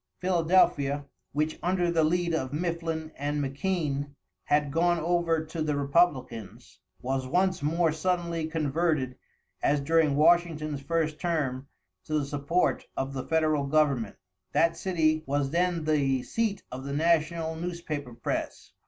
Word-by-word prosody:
Philadelphia, 165 Hz, -6 st, +2 dB, 0.3 s
which 155 Hz, +2 st, -1 dB
under 175 Hz, -1 st, +1 dB
the 165 Hz, -2 st, +3 dB
lead 170 Hz, +2 st, +1 dB
of 130 Hz, -5 st, -1 dB
Mifflin 165 Hz, 0 st, -3 dB
and 145 Hz, +1 st, -2 dB
McKean, 145 Hz, -1 st, -2 dB, 0.3 s
had 145 Hz, -1 st, +2 dB
gone 175 Hz, +3 st, +2 dB
over 165 Hz, -1 st, +1 dB
to 160 Hz, +1 st, -5 dB
the 150 Hz, -1 st, 0 dB
Republicans, 140 Hz, -, 0 dB, 0.2 s
was 130 Hz, 0 st, -1 dB
once 185 Hz, +4 st, +1 dB
more 165 Hz, +2 st, +2 dB
suddenly 170 Hz, 0 st, -1 dB
converted 155 Hz, -4 st, 0 dB, 0.5 s
as 145 Hz, +1 st, +2 dB
during 155 Hz, 0 st, +2 dB
Washington's 155 Hz, -2 st, +2 dB
first 155 Hz, 0 st, -1 dB
term 140 Hz, -6 st, -1 dB, 0.4 s
to 155 Hz, -, 0 dB
the 145 Hz, -, 0 dB
support 145 Hz, +5 st, 0 dB
of 135 Hz, +1 st, -2 dB
the 130 Hz, -1 st, -5 dB
federal 155 Hz, -3 st, +2 dB
government. 140 Hz, -7 st, +1 dB, 0.4 s
That 165 Hz, 0 st, +3 dB
city 160 Hz, -3 st, +1 dB
was 140 Hz, 0 st, 0 dB
then 175 Hz, -1 st, +1 dB
the 140 Hz, -4 st, +1 dB
seat 220 Hz, -3 st, -1 dB
of 130 Hz, +1 st, -6 dB
the 140 Hz, +1 st, -4 dB
national 160 Hz, +1 st, +1 dB
newspaper 160 Hz, -7 st, -5 dB
press. -, -, -4 dB
155 Hz, 135 wpm, -28 LUFS, 140-170 Hz, 0.5 s, the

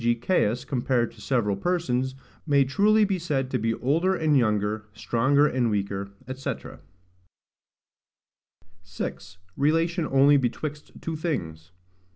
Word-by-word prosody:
g. 120 Hz, 0 st, +2 dB
Caius, 120 Hz, -, 0 dB
compared 125 Hz, -2 st, 0 dB
to -, -, -16 dB
several 115 Hz, -7 st, 0 dB
persons, 130 Hz, -, -1 dB, 0.3 s
may 140 Hz, -2 st, +4 dB
truly 210 Hz, +10 st, +3 dB
be 195 Hz, -2 st, -1 dB
said 135 Hz, -6 st, -2 dB
to 125 Hz, -, 0 dB
be 115 Hz, +1 st, 0 dB
older 165 Hz, +9 st, +1 dB
and 155 Hz, -3 st, +2 dB
younger, 105 Hz, -3 st, +1 dB
stronger 135 Hz, +7 st, +2 dB
and 125 Hz, -5 st, +1 dB
weaker, 100 Hz, -1 st, -2 dB, 0.2 s
&c. 130 Hz, +1 st, -3 dB, 2.3 s
6. 95 Hz, 0 st, -7 dB, 0.2 s
Relation 165 Hz, +3 st, +1 dB
only 140 Hz, +2 st, +5 dB
betwixt 145 Hz, +4 st, -3 dB
two 165 Hz, -, -4 dB
things. 85 Hz, -, -4 dB
130 Hz, 125 wpm, -26 LUFS, 115-155 Hz, 2.3 s, only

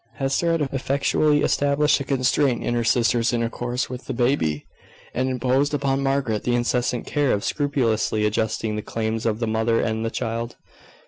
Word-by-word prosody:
Hester 140 Hz, +5 st, 0 dB
had 165 Hz, -, 0 dB
effectually 140 Hz, +2 st, +1 dB
established 145 Hz, +1 st, +2 dB
a -, -, -3 dB
constraint 130 Hz, -1 st, +1 dB
in -, -, -1 dB
her 120 Hz, 0 st, 0 dB
sister's 115 Hz, +1 st, +2 dB
intercourse 120 Hz, +1 st, -2 dB
with 125 Hz, 0 st, -8 dB
the -, -, -4 dB
baby, 120 Hz, -, 0 dB, 0.5 s
and 130 Hz, +1 st, 0 dB
imposed 130 Hz, +3 st, +1 dB
upon 135 Hz, -1 st, 0 dB
Margaret 135 Hz, -6 st, 0 dB
the 120 Hz, -, +1 dB
incessant 120 Hz, 0 st, 0 dB
care 145 Hz, -3 st, +1 dB
of 100 Hz, -, 0 dB
scrupulously 115 Hz, -7 st, 0 dB
adjusting 110 Hz, 0 st, -1 dB
the 105 Hz, -, -3 dB
claims 110 Hz, +1 st, -2 dB
of 110 Hz, -1 st, 0 dB
the 115 Hz, -, 0 dB
mother 110 Hz, +1 st, +1 dB
and 110 Hz, 0 st, -1 dB
the 115 Hz, -, -1 dB
child. 115 Hz, 0 st, -4 dB
120 Hz, 170 wpm, -23 LUFS, 115-140 Hz, 0.5 s, established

